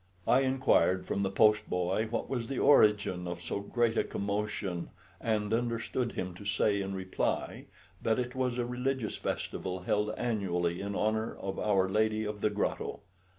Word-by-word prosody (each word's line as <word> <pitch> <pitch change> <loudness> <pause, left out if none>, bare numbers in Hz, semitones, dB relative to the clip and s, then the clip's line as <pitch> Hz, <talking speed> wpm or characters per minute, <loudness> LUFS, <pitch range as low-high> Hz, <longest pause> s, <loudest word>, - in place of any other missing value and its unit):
I 125 - +6
inquired 130 -8 +3
from 100 - -1
the 95 - +1
post 105 +1 +4
boy 90 +5 0
what 115 - -2
was 120 -4 -2
the 135 - -3
origin 100 -8 +4
of 85 0 -4
so 85 +3 -3
great 115 +3 +1
a - - +3
commotion, 100 -3 -3 0.3
and 110 -2 0
understood 120 +1 -1
him 90 -1 -3
to 100 - -10
say 100 0 +1
in 95 0 -3
reply 95 0 -2 0.4
that 110 -1 +1
it 125 -1 -2
was 125 -2 -1
a 120 - 0
religious 125 -1 -2
festival 95 -1 -3
held 105 +3 +1
annually 90 -7 -1
in 100 0 -3
honour 110 +1 0
of 95 0 -5
"Our 95 -3 +2
Lady 110 +2 +1
of 105 -1 -4
the 105 - +3
Grotto." 105 0 -2
105 Hz, 170 wpm, -31 LUFS, 95-115 Hz, 0.4 s, I